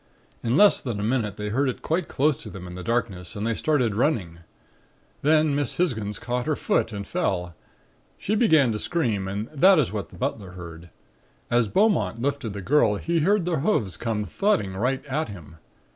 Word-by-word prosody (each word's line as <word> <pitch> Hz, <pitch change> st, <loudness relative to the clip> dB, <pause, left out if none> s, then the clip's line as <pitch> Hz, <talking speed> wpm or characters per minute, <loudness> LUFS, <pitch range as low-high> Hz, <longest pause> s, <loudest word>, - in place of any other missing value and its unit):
In 120 Hz, +4 st, +1 dB
less 205 Hz, -1 st, +6 dB
than 115 Hz, -6 st, -4 dB
a -, -, -2 dB
minute 110 Hz, -3 st, -1 dB
they 105 Hz, 0 st, -3 dB
heard 130 Hz, +5 st, +1 dB
it 125 Hz, -, -6 dB
quite 165 Hz, +1 st, -1 dB
close 150 Hz, +2 st, +1 dB
to -, -, -10 dB
them 95 Hz, -3 st, -9 dB
in 90 Hz, -, -8 dB
the 90 Hz, -, -7 dB
darkness 100 Hz, -3 st, -2 dB
and 105 Hz, +1 st, -3 dB
they 115 Hz, -, +1 dB
started 125 Hz, -3 st, +1 dB
running. 100 Hz, -, 0 dB, 0.8 s
Then 155 Hz, 0 st, +3 dB
Miss 140 Hz, -3 st, -1 dB
Hisgins 110 Hz, -, -1 dB
caught 125 Hz, +2 st, -3 dB
her 155 Hz, -, +1 dB
foot 115 Hz, -, 0 dB
and 100 Hz, -2 st, -5 dB
fell. 95 Hz, -, -2 dB, 0.6 s
She 205 Hz, -, -2 dB
began 160 Hz, -, +4 dB
to 105 Hz, -, -3 dB
scream 115 Hz, -, -1 dB
and 100 Hz, +3 st, -3 dB
that 185 Hz, +6 st, +5 dB
is 135 Hz, -, +2 dB
what 100 Hz, -5 st, -4 dB
the -, -, -14 dB
butler 110 Hz, -8 st, -3 dB
heard. 85 Hz, -1 st, -10 dB, 0.6 s
As 120 Hz, -2 st, +3 dB
Beaumont 115 Hz, -, +2 dB
lifted 135 Hz, -4 st, -2 dB
the 100 Hz, -1 st, -6 dB
girl 115 Hz, -3 st, +3 dB
he 170 Hz, +10 st, -1 dB
heard 190 Hz, +3 st, +2 dB
the 170 Hz, -4 st, 0 dB
hoofs 130 Hz, -, 0 dB
come 110 Hz, -3 st, -2 dB
thudding 105 Hz, -, 0 dB
right 130 Hz, +7 st, -1 dB
at 150 Hz, +3 st, -2 dB
him. 85 Hz, -6 st, -11 dB
120 Hz, 195 wpm, -25 LUFS, 100-150 Hz, 0.8 s, less